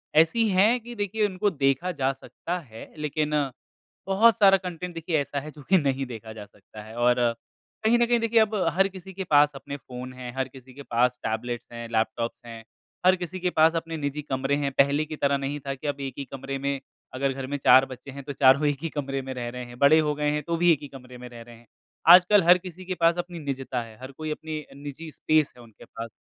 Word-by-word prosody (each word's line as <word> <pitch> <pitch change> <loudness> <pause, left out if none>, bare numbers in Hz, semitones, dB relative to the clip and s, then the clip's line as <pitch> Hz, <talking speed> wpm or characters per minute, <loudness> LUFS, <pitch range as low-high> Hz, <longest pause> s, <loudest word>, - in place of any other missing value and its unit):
ऐसी 165 +9 +4
है 205 +5 +4
कि 240 +1 -10
देखिए 210 0 0
उनको 200 +1 0
देखा 140 +1 0
जा 135 +1 +3
सकता 175 +6 -6
है, 115 -8 -12
लेकिन 150 0 -1 0.8
बहुत 220 +4 +5
सारा 195 -2 +6
कंटेंट 180 -1 -6
देखिए 165 -1 -1
ऐसा 140 0 -3
है 150 +2 -9
जो 150 - -14
कि 190 - +6
नहीं 135 -4 0
देखा 115 -3 -9
जा 105 -1 -9
सकता 105 +1 -14
है 110 +1 -12
और 120 +1 +3 0.7
कहीं 225 +2 +4
न 240 - +4
कहीं 240 0 +2
देखिए 230 0 +3
अब 220 0 +2 0.2
हर 195 +3 +3
किसी 190 0 -11
के 190 +1 -4
पास 150 -3 +4
अपने 140 +1 -7
फ़ोन 125 0 -9
हैं, 125 -1 -8
हर 130 - 0
किसी 130 -1 -15
के 140 +2 -10
पास 125 0 +1
टैबलेट्स 120 +2 -3
हैं, 115 0 -6
लैपटॉप्स 115 +1 -1
हैं, 115 -1 -9 0.4
हर 185 0 +6
किसी 180 +1 -6
के 180 0 0
पास 160 -1 +4
अपने 165 0 -3
निजी 145 0 -3
कमरे 135 -1 -1
हैं। 140 -1 -1
पहले 140 +2 +3
की 155 - -6
तरह 140 -1 +1
नहीं 140 +2 -3
था 135 - -1
कि 145 +3 -7
अब 140 -1 -2
एक 135 -2 -4
ही 140 - -4
कमरे 135 0 -5
में 140 0 -2 0.3
अगर 135 +1 0
घर 135 0 -6
में 145 +2 -3
4 130 -1 +6
बच्चे 130 +1 -10
हैं, 140 +1 -9
तो 140 - -6
चारों 140 +2 +5
एक 145 -1 0
ही 165 - -1
कमरे 135 -2 -3
में 130 0 -6
रह 120 -2 -4
रहे 125 0 -7
हैं 120 0 -12
बड़े 145 +3 +6
हो 150 -1 0
गए 150 0 0
हैं, 150 0 -2
तो 170 +3 -2
भी 175 +1 +5
एक 155 - +2
ही 145 - -7
कमरे 125 -2 -12
में 125 0 -9
रह 120 -1 -11
रहे 120 0 -13
हैं। 115 0 -20 0.4
आजकल 180 +3 +8
हर 175 +2 +7
किसी 185 0 -10
के 185 - -2
पास 165 +1 +4
अपनी 175 -1 -5
निजता 135 -4 -3
है, 115 -1 -11
हर 130 +1 -8
कोई 155 +3 -6
अपनी 155 0 -5
अ, - - -17
निजी 145 +3 -8
स्पेस 155 0 +1
है 120 - -13
उनके 115 -2 -16
पास। 115 0 -8
145 Hz, 245 wpm, -26 LUFS, 130-175 Hz, 0.8 s, आजकल